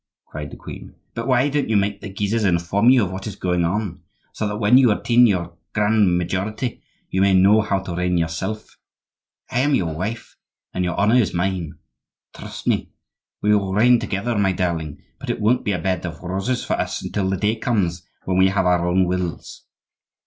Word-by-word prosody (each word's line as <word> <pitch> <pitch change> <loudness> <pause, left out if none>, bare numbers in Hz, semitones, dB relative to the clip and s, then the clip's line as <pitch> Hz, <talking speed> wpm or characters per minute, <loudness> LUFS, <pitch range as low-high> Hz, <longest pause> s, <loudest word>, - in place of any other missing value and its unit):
cried 75 -1 -7
the - - -11
queen. - - -10 0.2
"But 115 +2 -4
why 130 +1 +3
don't 145 -3 -1
you 110 - +3
make 100 0 -1
the 105 - -6
Guises 105 +3 -1
inform 95 +4 +2
you 125 -3 +5
of 90 - -6
what 95 +2 -6
is 105 - -5
going 90 -3 0
on, 95 +2 -2 0.3
so 105 - -2
that 105 0 -3
when 115 +4 +5
you 125 -4 +5
attain 120 +3 +4
your 85 -4 -1 0.2
grand 105 -4 +3
majority 100 +7 -3 0.3
you 95 - +1
may 100 -1 +4
know 100 +4 +5
how 100 -2 0
to 95 -2 -6
reign 90 0 0
yourself? 85 +6 -4 0.7
I 120 - 0
am 140 +2 +3
your 85 -9 -1
wife, 105 +8 -5 0.4
and 90 - -1
your 90 0 -2
honor 105 +3 +3
is 105 -8 +1
mine. 85 -3 -2 0.6
Trust - - -9
me! - - 0 0.5
we 105 0 +4
will 95 -2 -1
reign 120 +3 +5
together, 115 +4 -2
my 95 -2 +2
darling; 85 -5 -3 0.2
but - - -8
it - - -1
won't 120 +4 +2
be 105 - 0
a 95 - 0
bed 90 +1 -2
of 85 -1 -7
roses 95 +8 -2
for - - -1
us - - -3
until 95 -2 -2
the 95 - 0
day 105 +4 +1
comes 100 -8 -1 0.2
when 95 -1 0
we 95 - +6
have 95 -1 +1
our 90 -1 +2
own 90 +1 +3
wills. 90 -2 -4
95 Hz, 205 wpm, -21 LUFS, 90-110 Hz, 0.7 s, we